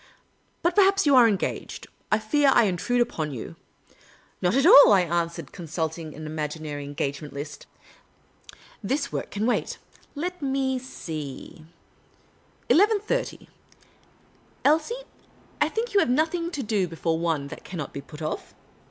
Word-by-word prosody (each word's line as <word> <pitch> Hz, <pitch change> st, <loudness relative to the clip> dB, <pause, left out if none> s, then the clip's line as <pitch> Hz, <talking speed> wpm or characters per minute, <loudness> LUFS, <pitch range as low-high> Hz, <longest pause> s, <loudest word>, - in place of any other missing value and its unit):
" -, -, -41 dB
But 345 Hz, -, +2 dB
perhaps 390 Hz, -1 st, +4 dB
you 285 Hz, -2 st, +5 dB
are 245 Hz, -2 st, +8 dB
engaged. 200 Hz, -4 st, -2 dB, 0.3 s
I 215 Hz, -, +5 dB
fear 275 Hz, +7 st, +2 dB
I -, -, +5 dB
intrude 215 Hz, +5 st, 0 dB
upon 160 Hz, -10 st, -1 dB
you." 110 Hz, -10 st, -7 dB, 0.4 s
" -, -, -29 dB
Not 180 Hz, +4 st, +2 dB
at 275 Hz, +2 st, +3 dB
all," 285 Hz, -, +9 dB
I 195 Hz, -, +5 dB
answered, 170 Hz, -3 st, -2 dB
consulting 160 Hz, -2 st, -5 dB
an 155 Hz, +1 st, -8 dB
imaginary 150 Hz, -1 st, -4 dB
en 145 Hz, 0 st, -8 dB
gagement 140 Hz, +1 st, -3 dB
list. 145 Hz, +1 st, -7 dB, 0.6 s
" -, -, -22 dB
This 280 Hz, +1 st, 0 dB
work -, -, -4 dB
can 210 Hz, +1 st, -2 dB
wait. 245 Hz, -, 0 dB, 0.4 s
I^et 360 Hz, +3 st, -4 dB
me 265 Hz, -1 st, 0 dB
see: 155 Hz, -, -8 dB, 1.0 s
11.30. 425 Hz, +6 st, +2 dB, 1.2 s
Elsie, 325 Hz, +12 st, +2 dB, 0.6 s
I -, -, +4 dB
think 455 Hz, +1 st, -3 dB
you 405 Hz, -, +5 dB
have 390 Hz, -, +2 dB
nothing 320 Hz, +6 st, +1 dB
to 290 Hz, -6 st, -4 dB
do 205 Hz, -4 st, 0 dB
l)efore 165 Hz, 0 st, -2 dB
one, 160 Hz, -4 st, -1 dB
that -, -, -9 dB
can 180 Hz, -, -8 dB
not 150 Hz, -4 st, -5 dB
be 140 Hz, -, -5 dB
put 150 Hz, +2 st, -10 dB
off? 155 Hz, -, -5 dB
200 Hz, 155 wpm, -25 LUFS, -, 1.2 s, all